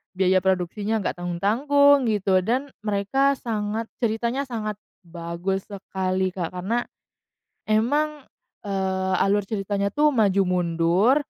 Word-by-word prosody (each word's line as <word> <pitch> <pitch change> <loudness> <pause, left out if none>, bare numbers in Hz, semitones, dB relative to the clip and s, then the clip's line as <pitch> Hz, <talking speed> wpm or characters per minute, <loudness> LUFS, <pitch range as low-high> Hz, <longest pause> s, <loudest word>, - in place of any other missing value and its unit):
biaya 185 0 +3
produksinya 190 +4 0
nggak 175 - -3
tanggung-tanggung, 260 +10 +3
gitu, 195 -3 +2
dan 255 +8 -1
mereka 215 +7 +1
sangat 220 -2 -3
ceritanya 235 +4 -1
sangat 215 -4 -4 0.2
bagus 170 +3 -4
sekali, 190 -2 -2
Kak. 180 -1 -5
Karena 215 +7 -1 0.9
emang, 290 +7 +1 0.4
eee, 190 -1 -1
alur 200 0 +2
ceritanya 200 -1 -2
tuh 300 0 +4
maju 205 -7 +3
mundur, 180 +6 +2
200 Hz, 110 wpm, -24 LUFS, 185-235 Hz, 0.9 s, tuh